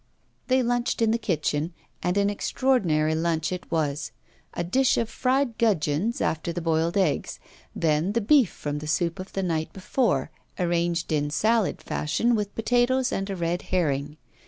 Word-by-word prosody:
They 260 Hz, -1 st, +3 dB
lunched 245 Hz, 0 st, 0 dB
in 220 Hz, -, +3 dB
the 230 Hz, -, +1 dB
kitchen, 155 Hz, -4 st, -1 dB, 0.3 s
and 180 Hz, +2 st, 0 dB
an 200 Hz, 0 st, +3 dB
extraordinary 185 Hz, -10 st, +1 dB
lunch 160 Hz, 0 st, 0 dB
it 180 Hz, -2 st, -6 dB
was; 150 Hz, -3 st, -1 dB, 0.4 s
a -, -, -1 dB
dish 255 Hz, +10 st, +2 dB
of 230 Hz, -, +1 dB
fried 255 Hz, -2 st, 0 dB
gudgeons 200 Hz, -1 st, +1 dB
after 160 Hz, +2 st, -1 dB
the 170 Hz, -, -3 dB
boiled 165 Hz, +1 st, 0 dB
eggs; 170 Hz, -8 st, 0 dB, 0.4 s
then 160 Hz, +4 st, +1 dB
the 235 Hz, -, +2 dB
beef 245 Hz, -, +5 dB
from 145 Hz, 0 st, -4 dB
the 155 Hz, -, -7 dB
soup 170 Hz, +3 st, 0 dB
of 185 Hz, -, -8 dB
the 195 Hz, -, -1 dB
night 160 Hz, -3 st, -1 dB
before, 185 Hz, -, 0 dB, 0.3 s
arranged 170 Hz, -1 st, 0 dB
in 145 Hz, -1 st, +1 dB
salad 215 Hz, +8 st, +1 dB
fashion, 230 Hz, +11 st, 0 dB
with 210 Hz, -2 st, -2 dB
potatoes, 245 Hz, +3 st, +2 dB
and 195 Hz, +1 st, -2 dB
a 195 Hz, -, -2 dB
red 170 Hz, 0 st, -1 dB
herring. 150 Hz, -4 st, -1 dB
175 Hz, 165 wpm, -25 LUFS, 160-225 Hz, 0.4 s, beef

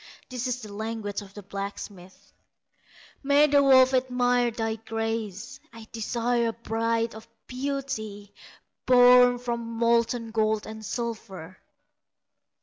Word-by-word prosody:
This 250 Hz, -1 st, -3 dB
the 210 Hz, -1 st, -9 dB
language 215 Hz, -1 st, -4 dB
of 200 Hz, -1 st, -14 dB
the 205 Hz, -, -9 dB
blacksmith: 195 Hz, -1 st, -8 dB, 0.9 s
"May 285 Hz, +1 st, +4 dB
the 285 Hz, -1 st, +4 dB
wolf 260 Hz, -1 st, +6 dB
admire 245 Hz, -1 st, +2 dB
thy 225 Hz, -1 st, -3 dB
graces; 225 Hz, -2 st, -4 dB
I 225 Hz, -1 st, -12 dB
desire 235 Hz, +1 st, -1 dB
a 225 Hz, -, -2 dB
bride 230 Hz, 0 st, -1 dB
of 220 Hz, +1 st, -12 dB, 0.2 s
beauty 250 Hz, -7 st, -5 dB, 0.5 s
Born 245 Hz, 0 st, +7 dB
from 240 Hz, -1 st, -3 dB
molten 230 Hz, 0 st, 0 dB
gold 220 Hz, -1 st, 0 dB
and 220 Hz, 0 st, -9 dB
silver!" 205 Hz, -5 st, -6 dB
230 Hz, 115 wpm, -26 LUFS, 215-245 Hz, 0.9 s, Born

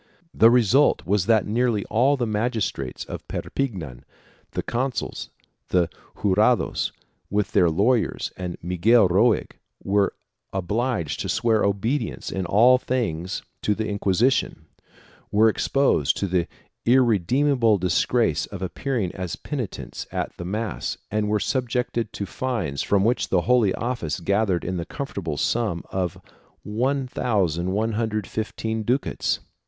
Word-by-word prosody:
The 115 Hz, -, +6 dB
result 125 Hz, +4 st, +4 dB
was 100 Hz, 0 st, +1 dB
that 110 Hz, -2 st, +4 dB
nearly 115 Hz, -1 st, 0 dB
all 130 Hz, +6 st, +2 dB
the 120 Hz, -, 0 dB
magistrates 105 Hz, -, -2 dB
of -, -, -8 dB
Perpignan 85 Hz, -, -4 dB, 0.2 s
— -, -, -32 dB
the -, -, -2 dB
consuls 130 Hz, +2 st, -3 dB, 0.4 s
and 90 Hz, -2 st, +3 dB, 0.4 s
jurados 105 Hz, +5 st, +2 dB, 0.4 s
with 105 Hz, 0 st, 0 dB
their 90 Hz, -4 st, +4 dB
lawyers 110 Hz, +9 st, +1 dB
and 90 Hz, -1 st, -5 dB
Miguel 95 Hz, +5 st, +4 dB
Roig 105 Hz, +6 st, +3 dB, 0.2 s
— -, -, -31 dB
were 100 Hz, 0 st, +1 dB, 0.4 s
obliged 95 Hz, -, -1 dB
to -, -, -3 dB
swear 110 Hz, -2 st, +2 dB
obedience 110 Hz, +8 st, -1 dB
in 95 Hz, -2 st, -3 dB
all 120 Hz, +7 st, +5 dB
things 95 Hz, -10 st, -2 dB, 0.2 s
to 105 Hz, -, +1 dB
the 110 Hz, +1 st, -2 dB
Inquisition, 105 Hz, +5 st, +1 dB, 0.7 s
were 110 Hz, +2 st, +5 dB
exposed 110 Hz, -, +2 dB
to -, -, -1 dB
the 90 Hz, -2 st, 0 dB, 0.4 s
irredeemable 120 Hz, 0 st, +3 dB
disgrace 90 Hz, -, +1 dB
of 95 Hz, -2 st, -7 dB
appearing 110 Hz, -1 st, -2 dB
as 90 Hz, -3 st, -4 dB
penitents 130 Hz, -9 st, -5 dB
at -, -, -3 dB
the 85 Hz, -, -6 dB
mass 105 Hz, +2 st, -3 dB
and 105 Hz, 0 st, 0 dB
were 105 Hz, 0 st, +2 dB
subjected 120 Hz, -2 st, -1 dB
to 100 Hz, -, -4 dB
fines 100 Hz, -, -2 dB
from 100 Hz, -1 st, +2 dB
which 115 Hz, +2 st, +1 dB
the 90 Hz, -, +3 dB
Holy 120 Hz, -2 st, +3 dB
Office 115 Hz, -11 st, -3 dB
gathered 100 Hz, 0 st, +1 dB
in 90 Hz, 0 st, -2 dB
the 85 Hz, -, -3 dB
comfortable 95 Hz, -, -5 dB
sum 105 Hz, -, 0 dB
of 90 Hz, -3 st, -2 dB, 0.4 s
1115 110 Hz, -, -1 dB
ducats. 125 Hz, +6 st, 0 dB
105 Hz, 130 wpm, -24 LUFS, 95-120 Hz, 0.7 s, The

